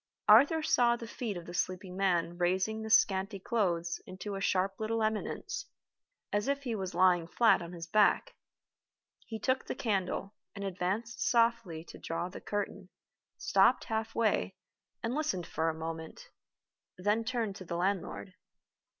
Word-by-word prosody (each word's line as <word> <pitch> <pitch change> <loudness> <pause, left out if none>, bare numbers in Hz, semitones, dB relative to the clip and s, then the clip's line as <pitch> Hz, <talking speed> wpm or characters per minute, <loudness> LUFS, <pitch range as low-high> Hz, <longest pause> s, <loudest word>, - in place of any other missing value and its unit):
Arthur 285 +9 +7
saw 240 -5 +4
the 235 - -7
feet 225 -3 -4
of 170 - -8
the 175 - -8
sleeping 185 +1 -2
man 175 -3 +1
raising 190 +5 +1
the 220 - -5
scanty 195 -2 +3
clothes 175 -5 -1
into 190 +2 -6
a 195 - -4
sharp 195 0 +1
little 220 +1 0
eminence, 220 - -2 0.7
as 205 +3 +1
if 280 0 0
he 245 -4 -2
was 190 -4 -4
lying 180 -3 +4
flat 225 0 +4
on 170 0 -7
his 170 -1 -6
back. 210 +5 +3 0.9
He 225 - -4
took 260 +3 0
the - - -3
candle, 195 -3 -1 0.2
and 200 - -5
advanced 195 +5 -2
softly 230 -9 +2
to - - -12
draw 170 +2 -3
the 185 - -9
curtain 200 -2 -4 0.5
stopped 250 - +4
half 220 0 -3
way, 230 -2 +1 0.5
and 230 +2 -1
listened 225 - -1
for 160 0 -1
a - - -1
moment 165 - -7 0.7
then 205 +5 +1
turned 230 -4 -2
to - - -8
the 170 0 -3
landlord. 185 +1 -2
200 Hz, 160 wpm, -31 LUFS, 180-230 Hz, 0.9 s, Arthur